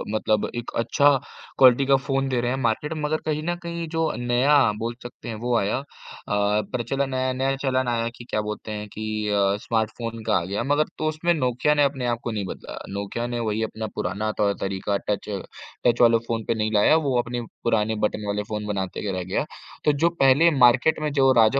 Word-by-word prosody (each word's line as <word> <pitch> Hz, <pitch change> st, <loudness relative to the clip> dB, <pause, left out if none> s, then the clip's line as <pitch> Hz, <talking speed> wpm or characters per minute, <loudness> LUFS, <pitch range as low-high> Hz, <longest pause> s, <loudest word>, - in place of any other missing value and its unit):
मतलब 110 Hz, -1 st, +1 dB
एक 120 Hz, 0 st, -5 dB
अच्छा 140 Hz, +5 st, +4 dB, 0.5 s
क्वालिटी 130 Hz, +1 st, +6 dB
का 135 Hz, 0 st, +5 dB
फ़ोन 135 Hz, 0 st, -1 dB
दे 125 Hz, -2 st, 0 dB
रहे 120 Hz, +1 st, 0 dB
हैं 130 Hz, -, -1 dB
मार्केट 135 Hz, +5 st, -1 dB
में। 155 Hz, -, -5 dB
मगर 150 Hz, +1 st, 0 dB
कहीं 155 Hz, 0 st, -1 dB
न 175 Hz, +1 st, -1 dB
कहीं 170 Hz, -1 st, -4 dB
जो 160 Hz, -1 st, 0 dB
नया 120 Hz, +4 st, +3 dB, 0.2 s
बोल 115 Hz, +1 st, -3 dB
सकते 120 Hz, 0 st, -10 dB
हैं 110 Hz, -, -4 dB
वो 120 Hz, 0 st, 0 dB
आया 100 Hz, +3 st, 0 dB
अ, -, -, -8 dB, 0.5 s
प्रचलन 115 Hz, +6 st, 0 dB
आया, 130 Hz, 0 st, 0 dB
नया 135 Hz, +1 st, 0 dB
चलन 130 Hz, -2 st, +1 dB
आया 115 Hz, -1 st, 0 dB
कि 120 Hz, -, -10 dB
क्या 105 Hz, -, 0 dB
बोलते 105 Hz, +1 st, -5 dB
हैं 105 Hz, 0 st, -5 dB
कि 110 Hz, 0 st, -3 dB
अ, 100 Hz, -1 st, +2 dB
स्मार्टफ़ोन 115 Hz, 0 st, -2 dB
का -, -, +3 dB
आ 85 Hz, -, -1 dB
गया 100 Hz, +4 st, -2 dB
मगर 145 Hz, +3 st, +2 dB
तो 155 Hz, -, -1 dB
उसमें 160 Hz, +3 st, +1 dB
नोकिया 130 Hz, 0 st, +1 dB
ने 145 Hz, -, +3 dB
अपने 135 Hz, -2 st, 0 dB
आप 120 Hz, -1 st, 0 dB
को 120 Hz, -, -2 dB
नहीं 105 Hz, -3 st, -3 dB
बदला। -, -, -8 dB, 0.2 s
नोकिया 100 Hz, +4 st, -3 dB
ने 120 Hz, 0 st, -3 dB
वही 110 Hz, -1 st, -1 dB
अपना 110 Hz, 0 st, -4 dB
पुराना 105 Hz, +4 st, -2 dB
तौर-तरीका, 100 Hz, -1 st, 0 dB
टच 105 Hz, +1 st, -2 dB, 0.6 s
टच 120 Hz, 0 st, +3 dB
वाले 115 Hz, -1 st, +6 dB
फ़ोन 115 Hz, -1 st, -2 dB
पे -, -, +2 dB
नहीं 110 Hz, 0 st, -1 dB
लाया, 105 Hz, +9 st, +5 dB
वो 140 Hz, -6 st, +1 dB
अपने 120 Hz, 0 st, -2 dB, 0.2 s
पुराने 110 Hz, -1 st, +1 dB
बटन 105 Hz, 0 st, -1 dB
वाले 105 Hz, 0 st, -1 dB
फ़ोन 105 Hz, -1 st, -3 dB
बनाते 100 Hz, 0 st, -3 dB
रह 95 Hz, -1 st, -3 dB
गया। 95 Hz, +10 st, -1 dB, 0.4 s
तो 150 Hz, -, +5 dB
जो 170 Hz, -, +6 dB
पहले 135 Hz, +5 st, +6 dB
मार्किट 125 Hz, +6 st, +5 dB
में 150 Hz, -, -1 dB
जो 135 Hz, -2 st, +4 dB
राजा 115 Hz, +5 st, +4 dB
120 Hz, 215 wpm, -24 LUFS, 105-135 Hz, 0.6 s, क्वालिटी